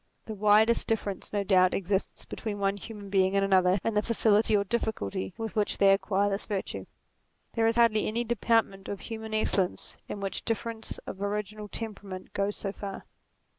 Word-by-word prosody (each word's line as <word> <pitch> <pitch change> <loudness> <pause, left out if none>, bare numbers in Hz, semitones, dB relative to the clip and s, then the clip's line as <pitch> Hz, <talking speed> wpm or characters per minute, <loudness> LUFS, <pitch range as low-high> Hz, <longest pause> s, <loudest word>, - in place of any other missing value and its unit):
The 220 - -5
widest 215 +3 +4
difference 205 -3 -2
no 205 -1 0
doubt 185 -2 +4
exists 195 +1 -2
between 215 -3 -5
one 195 0 +1
human 205 -1 -9
being 190 0 +3
and 195 0 +3
another 185 -1 +4
in 225 - 0
the 210 - +3
facility 215 -1 +3
or 200 - +1
difficulty 185 - -2
with 225 -1 -5
which 210 -1 +1
they 195 -1 +6
acquire 200 0 +1
this 200 0 -2
virtue. 200 -3 -4 0.7
There 225 -1 +2
is 225 - +2
hardly 230 -2 +4
any 230 +3 0
department 225 -4 +1
of 200 - -5
human 220 -1 -5
excellence 195 -4 0
in 205 - -4
which 195 -2 -3
difference 225 0 -2
of 190 - -7
original 210 +1 -3
temperament 200 -4 -5
goes 200 +1 -1
so 195 - -3
far. 200 -1 -7
205 Hz, 175 wpm, -28 LUFS, 195-220 Hz, 0.7 s, they